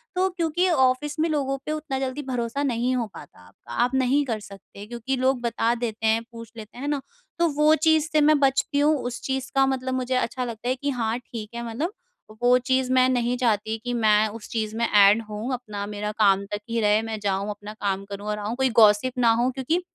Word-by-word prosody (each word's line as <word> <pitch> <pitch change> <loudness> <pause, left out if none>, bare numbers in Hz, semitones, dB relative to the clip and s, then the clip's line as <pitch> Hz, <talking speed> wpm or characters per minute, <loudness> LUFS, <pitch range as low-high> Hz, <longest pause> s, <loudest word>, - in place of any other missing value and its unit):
तो 370 +1 +2
क्योंकि 350 0 0
ऑफ़िस 290 0 +1
में 320 - +2
लोगों 275 -3 -1
पे - - -3
उतना 305 -3 -3
जल्दी 265 +2 -3
भरोसा 250 +2 -2
नहीं 250 -1 0
हो 240 -2 0
पाता, 90 -10 -14 0.2
आप 245 - 0
नहीं 265 +2 +2
कर 225 -4 -2
सकते, 200 0 -12
क्योंकि 240 +3 -3
लोग 260 -1 +1
बता 235 0 0
देते 225 -2 -4
हैं, 220 +1 +3
पूछ 230 -1 -10
लेते 220 +1 -10
हैं, 255 - -7
है - - -1
ना? 285 - -1 0.4
तो 340 - +4
वो 300 +2 +4
चीज़ 315 0 +2
से 305 - +3
मैं 300 0 +5
बचती 280 +2 +1
हूँ। 300 +2 +4
उस 245 -1 -5
चीज़ 265 0 -3
का 270 - +5
मतलब 260 -1 -2
मुझे 255 0 -1
अच्छा 255 0 -1
लगता 235 0 -5
है 255 - +1
कि 285 +2 -3
हाँ, 235 -3 -1
ठीक 225 -3 -8
है। 235 - -4
मतलब 305 - -3 0.5
वो 245 +1 +5
चीज़ 260 0 0
मैं 255 0 +5
नहीं 245 -1 0
चाहती 220 -2 0
कि 245 0 -3
मैं 215 -2 +3
उस 215 0 -9
चीज़ 220 -1 -2
में 235 - +1
एड 205 +2 +6
होऊँ, 215 +5 -4
अपना 210 -5 -5
मेरा 210 0 -4
काम 200 -2 +4
तक 205 - -2
ही 230 0 0
रहे। 210 +1 +3
मैं 225 -1 -5
जाऊँ, 200 0 -1
अपना 210 +1 -7
काम 200 -2 -3
करूँ, 200 +1 -6
और 210 0 -2
आऊँ। 210 +3 -3
कोई 265 0 +1
गॉसिप 210 +4 +4
ना 235 -2 +4
हो, 250 - +2
क्योंकि 270 +7 -1
245 Hz, 230 wpm, -24 LUFS, 215-270 Hz, 0.5 s, एड